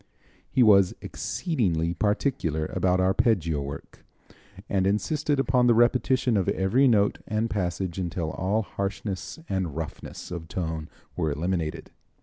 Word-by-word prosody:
He 130 - +4
was 100 -4 +5
exceedingly 95 - -1
particular 90 - 0
about 90 0 +2
arpeggio 95 -5 +2
work, 70 0 -8 0.6
and 95 -1 +1
insisted 145 +8 0
upon 125 -1 +3
the 120 - +5
repetition 125 0 +3
of 95 - +1
every 110 +9 +3
note 105 -4 +3
and 110 +2 -1
passage 90 -2 -2
until 85 -3 -2
all 105 +4 0
harshness 100 - -4
and 95 -6 -2
roughness 80 +2 -7
of 85 -2 -5
tone 80 -3 -4 0.3
were 80 - 0
eliminated. 80 +1 -2
95 Hz, 130 wpm, -26 LUFS, 85-110 Hz, 0.6 s, was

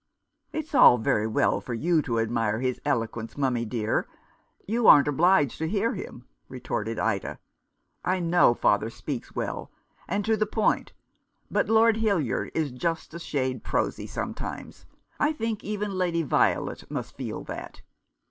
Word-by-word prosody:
" - - -53
It's 310 0 -5
all 250 - +8
very 110 -1 +1
well 110 - +1
for 120 - -5
you 165 +6 +2
to 115 -5 -1
admire 115 -1 0
his 125 0 -2
elo 115 -1 +1
quence, 115 +2 -8
mummy 125 -4 0
dear. 110 -1 -1 0.6
You 230 +3 +3
ain't 145 -1 +8
obliged 150 -1 +3
to 160 - -1
hear 215 +6 0
him," - - -8 0.2
retorted - - -4
Ida. - - -1 0.4
" - - -51 0.2
I 185 +1 +1
know 170 -7 +4
father 105 0 +2
speaks 130 +2 -6
well, - - -4 0.4
and 205 0 -1
to 220 0 +3
the 215 0 0
point; 215 +1 0 0.6
but - - +1
Lord 225 0 +5
Hildyard 200 - 0
is 155 -4 0
just 165 +5 -3
a 170 - -6
shade 130 -5 -2
prosy - - -1
sometimes. - - -6 0.3
I 300 +1 +2
think 225 -6 -3
even 210 0 -3
Lady 175 -3 0
Violet 145 - 0
must - - -5
feel - - -5
that." - - -8
160 Hz, 160 wpm, -26 LUFS, -, 0.6 s, all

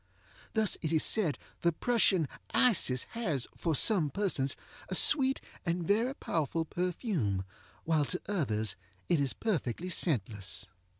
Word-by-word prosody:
Thus 220 -2 +2
it 155 - -2
is 160 -2 +3
said 185 -10 +1 0.2
the 170 - +3
Prussian 190 - +2 0.3
Isis 175 - +4
has, 165 - -1
for 165 -3 -1
some 175 - +4
persons, 140 -6 0 0.3
a - - -1
sweet 270 -2 +4 0.2
and 170 -1 -1
very 230 +8 +1
powerful 160 - -1
perfume, 170 - -1 0.4
while 155 -3 +2
to 180 - -1
others 110 - -1 0.3
it 170 - +3
is 140 -2 +1
perfectly 175 - -2
scentless. 110 - -1
165 Hz, 130 wpm, -31 LUFS, 140-205 Hz, 0.4 s, Isis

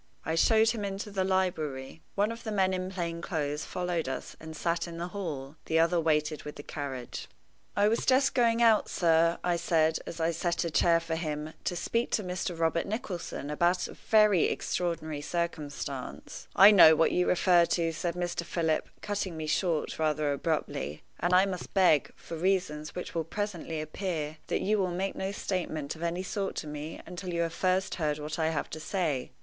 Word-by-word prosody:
I 160 - -1
showed 220 +6 +4
him 220 -3 -4
into 200 +1 -4
the 195 -1 0
library. 160 -7 -1
One 205 +2 +2
of 230 - -8
the 220 - -4
men 190 -2 +2
in 185 0 -2
plain 170 -3 -3
clothes 150 -4 -2
followed 175 -5 -2
us, 135 - -5
and 160 0 -9
sat 170 +2 -1
in 170 -1 -7
the 175 +1 -4
hall. 155 -7 -5
The 160 - +1
other 165 +1 +3
waited 155 -1 +1
with 150 - -8
the 145 - -9
carriage. 135 -5 -6 0.5
"I 205 +1 +4
was 225 +2 +1
just 265 +1 +3
going 235 -2 +3
out, 225 -2 +4
sir," 165 -1 +3
I 175 -1 +1
said, 160 -2 +2
as 170 - -6
I 165 +1 +2
set 170 +2 -1
a 170 - -2
chair 165 +3 +4
for 165 0 -4
him, 155 -1 -3
"to 180 - 0
speak 230 +7 -1
to 215 - +1
Mr. 180 -1 -3
Robert 165 0 +1
Nicholson 180 - -4
about 175 +3 +2
a - - -9
very 210 -5 +4
extraordinary 160 -4 -2
circumstance 150 -5 -4
" - - -29
"I 210 - +11
know 160 -6 +9
what 165 - +3
you 180 - +2
refer 175 -1 +5
to," 165 -1 +1
said 170 +2 -2
Mr. 175 -1 -2
Philip, 165 -2 -1
cutting 200 -5 -2
me 155 - -3
short 160 0 0
rather 155 -2 +1
abruptly; 140 - -2 0.2
"and 175 +2 0
I 185 +1 +6
must 185 -1 -5
beg, 180 -7 +4
for 165 - -8
reasons 165 -4 -1
which 180 - -5
will 165 - 0
presently 170 -2 -4
appear, 155 -1 -3
that - - 0
you 210 +2 +2
will 185 -2 +1
make 185 +3 -2
no 190 +1 -3
statement 165 -7 -3
of 160 - -12
any 170 +2 -1
sort 195 0 -3
to - - -4
me 150 +1 -6
until 180 +1 -6
you 170 0 0
have 165 -1 -1
first 185 +1 +1
heard 150 -1 +1
what 150 +2 -5
I 160 0 +2
have 155 -2 -2
to 155 - -5
say. 155 -6 -1
170 Hz, 200 wpm, -29 LUFS, 155-185 Hz, 0.5 s, I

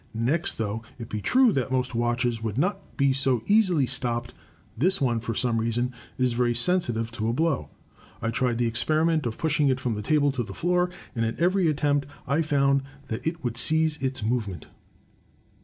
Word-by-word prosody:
Next, 130 +9 +1
though 110 0 -2 0.2
it 115 -3 -8
be 105 - -4
true 255 - +4
that 130 -2 -1
most 125 -1 0
watches 120 0 0
would 110 -1 -3
not 180 +8 -2
be 140 -1 +3
so 130 -4 +1
easily 190 -9 +3
stopped, 120 -2 -2 0.4
this 185 - +2
one, 120 -4 +1
for 115 0 -4
some 115 -1 +1
reason, 120 +2 -1 0.2
is 125 -2 +1
very 120 0 +1
sensitive 120 -6 +1
to 110 -1 -2
a - - 0
blow. 155 -1 0 0.5
I 115 - -2
tried 120 0 0
the 120 - +1
experiment 155 +5 +2
of 115 - -5
pushing 150 -2 +1
it 130 -1 +1
from 125 -3 -1
the 105 - -4
table 145 +3 +2
to 130 -2 -2
the 115 - -6
floor, 180 +1 +1 0.2
and 115 - -1
at 115 +4 -2
every 180 +1 +2
attempt 145 -2 +1 0.2
I 145 +4 +1
found 140 -3 +2 0.3
that 110 +7 -4
it 165 -1 -3
would 120 -2 -3
cease 160 +4 +2
its 130 -3 -3
movement." 105 -7 -2
130 Hz, 190 wpm, -26 LUFS, 115-155 Hz, 0.5 s, true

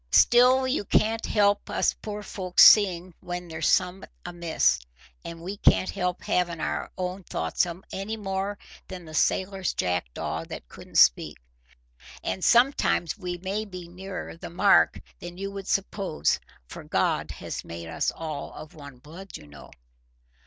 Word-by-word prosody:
Still 250 +2 +6
you 260 -4 0
can't 220 +3 +1
help 205 -1 +2
us - - +1
poor 210 -1 -7
folks 185 -3 +3
seeing 185 -4 +6
when 175 0 -6
there's 160 -1 -2
summat 180 +1 +1 0.2
amiss, 170 - +1 0.4
and 165 0 -8
we 195 +3 -5
can't 185 - +3
help 180 -2 -2
havin' 175 -2 0
our - - -3
own 185 +1 -3
thoughts 80 - -1 0.3
any 205 +3 -4
more 195 0 -3 0.3
than 180 -2 -8
the 155 - -11
sailor's 190 +4 0
jackdaw 90 -9 -2
that - - -9
couldn't - - -8
speak. - - +4 0.9
And 95 - -3
sometimes 240 - +3
we 180 -4 -5
may 195 +4 -3
be 185 -4 -9
nearer 185 0 -7
the 165 - -9
mark 195 +4 +4 0.2
than 175 0 -9
you 195 +1 -4
would 195 -1 -7
suppose, 195 - 0 0.3
for - - -9
God - - 0
has - - -6
made 85 0 -8
us 80 - -1
all 155 -3 -6
of 155 - -10
one 140 -4 -12
blood, 170 +9 -11
you - - -15
know." 70 -1 -14
180 Hz, 150 wpm, -26 LUFS, 165-200 Hz, 0.9 s, Still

